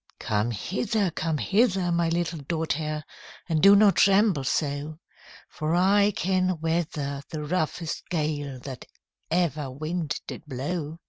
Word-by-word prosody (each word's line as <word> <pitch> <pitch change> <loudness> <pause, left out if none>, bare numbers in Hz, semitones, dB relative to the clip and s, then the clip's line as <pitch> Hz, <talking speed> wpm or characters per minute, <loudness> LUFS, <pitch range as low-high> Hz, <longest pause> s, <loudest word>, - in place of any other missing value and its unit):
'Come 105 +2 0
hither! 195 - -1
come 160 -1 -1
hither! 195 - +2
my 170 -1 +1
little 170 -1 -1
daughtèr. 155 0 -2 0.4
And 160 -3 +1
do 200 +3 +8
not 200 -1 +5
tremble 195 -6 +4
so; 145 +2 -2 0.5
For 155 +2 -2
I 200 +3 +4
can 185 -1 +1
weather 155 -4 -2
the 155 -2 -5
roughest 160 0 -2
gale 150 -4 -2
That 130 -1 -8 0.4
ever 155 -5 0
wind 155 +3 -3
did - - -7
blow.' 150 +4 -4
160 Hz, 130 wpm, -26 LUFS, 150-180 Hz, 0.5 s, do